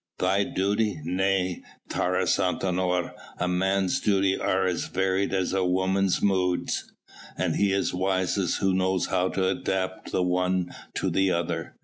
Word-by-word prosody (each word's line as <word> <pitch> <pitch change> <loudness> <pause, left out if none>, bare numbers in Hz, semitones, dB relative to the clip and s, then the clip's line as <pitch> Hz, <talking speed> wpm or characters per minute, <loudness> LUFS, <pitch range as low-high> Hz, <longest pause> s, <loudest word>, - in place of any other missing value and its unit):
"Thy 95 +2 +2
duty? 100 -1 0
Nay, 95 +1 0 0.3
Taurus - - +1
Antinor, 90 -1 0 0.2
a 90 - -1
man's 95 +1 +1
duties 95 -2 +2
are 95 0 +1
as 90 -3 -1
varied 95 +1 0
as 95 -1 0
a 95 -1 +1
woman's 95 +1 +1
moods, 90 -3 0 0.5
and - - 0
he 100 -1 +2
is 100 0 0
wisest 95 0 0
who 95 -1 +2
knows 95 0 +1
how 95 0 0
to 95 -1 0
adapt 95 0 -2
the 90 - +1
one 90 0 0 0.2
to - - -1
the 95 0 +2
other. 85 -1 -2
95 Hz, 145 wpm, -26 LUFS, 90-95 Hz, 0.5 s, Thy